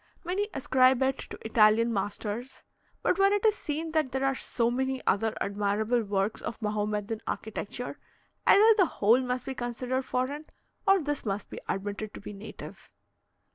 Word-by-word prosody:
Many 375 +4 -1
ascribe 260 -3 +3
it 265 0 0
to - - -7
Italian 225 +1 +4
masters; 210 +5 -4 0.4
but 370 - +2
when 395 0 +5
it 410 +1 0
is 435 - +6
seen 320 -3 -4
that 310 -5 +1
there 265 +1 0
are 270 - +2
so 235 -2 0
many 265 +1 -1
other 220 +2 +1
admirable 210 +4 0
works 200 0 -1
of - - -5
Mahomedan 210 0 -2
architecture, 220 +4 -5 0.5
either 435 +3 +8
the 375 -4 +5
whole 225 +5 +5
must 250 -1 -2
be 270 - -3
considered 250 +1 -2
foreign 265 +4 -2 0.4
or 390 0 +6
this 290 -1 -2
must 200 -1 -3
be - - -6
admitted 205 +2 -3
to - - -7
be 210 - -8
native. 200 +2 -10
245 Hz, 165 wpm, -28 LUFS, 210-270 Hz, 0.5 s, either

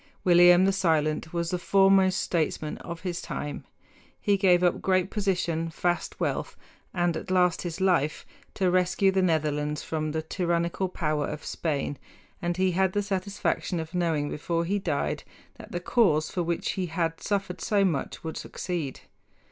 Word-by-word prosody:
William 175 0 +7
the 195 - +4
Silent 160 -4 +1
was 170 -1 -2
the 180 - -1
foremost 195 0 +4
statesman 155 -2 -1
of 170 -1 -7
his 180 -2 -3
time. 145 - -5 0.5
He 205 -2 +2
gave 180 -2 +4
up 175 - +2
great 185 0 +1
position, 175 -5 -1
vast 175 +2 -2
wealth, - - -2 0.3
and 175 -2 0
at - - -6
last 180 -2 +3
his 175 0 -5
life, 170 -6 +1 0.3
to 185 -2 +2
rescue 185 +2 +3
the 190 0 +2
Netherlands 150 -3 0
from 155 -1 -2
the 160 +1 -2
tyrannical 170 +2 -1
power 150 -4 -1
of 150 0 -6
Spain; 145 -3 -2 0.4
and 175 0 -1
he 185 0 +2
had 190 +1 +1
the 205 - 0
satisfaction 195 -2 -2
of 160 +1 -6
knowing 165 -5 0
before 170 +2 -1
he 200 +4 0
died 155 -7 -1 0.4
that - - -11
the 175 - -2
cause 175 -6 +2
for 180 - -1
which 170 0 -1
he 185 -2 -2
had 165 0 -2
suffered 195 -3 -2
so 200 -2 +2
much 160 -7 -2
would 160 -1 -5
succeed. 165 -7 -4
175 Hz, 165 wpm, -27 LUFS, 160-190 Hz, 0.5 s, William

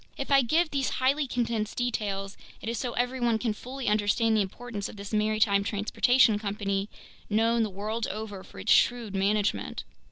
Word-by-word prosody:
If 275 - -4
I 275 -1 +7
give 315 +7 +1
these 275 -2 0
highly 275 +3 +2
condensed 230 -4 -2
details, 205 -5 -2 0.2
it - - -9
is 230 0 -2
so 245 -2 -3
everyone 245 -2 +1
can 220 -1 -1
fully 255 +4 -7
understand 215 +2 +2
the 215 - +3
importance 205 +1 -5
of - - -11
this 200 +1 -8
maritime 215 -1 +2
transportation 215 +2 +3
company, 200 -1 -2 0.4
known 225 +2 +2
the 220 - 0
world 215 +4 -3
over 205 -2 -6
for - - -15
its 220 - -1
shrewd 235 -4 +2
management. 200 +1 0
220 Hz, 170 wpm, -28 LUFS, 205-245 Hz, 0.4 s, I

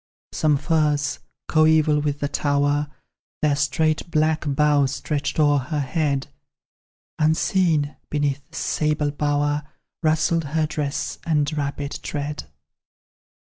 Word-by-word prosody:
Some 150 -2 +2
firs, 150 -1 +1 0.3
coeval 155 -1 +4
with 145 -1 -2
the 145 - +1
tower, 145 0 +1 0.6
Their 150 -2 +3
straight 155 +3 0
black 155 -1 +1
boughs 145 -1 +2
stretched 150 +1 -2
o'er 145 -1 +4
her 145 +4 -3
head; 140 0 0 0.9
Unseen, 160 -1 +2
beneath 145 -1 0
this - - -10
sable 150 -1 0
bower, 145 0 0 0.4
Rustled 160 0 +2
her 160 -1 +3
dress 150 -2 -3
and 150 -2 0
rapid 140 -1 -3
tread. 145 0 -4
150 Hz, 110 wpm, -23 LUFS, 145-155 Hz, 0.9 s, coeval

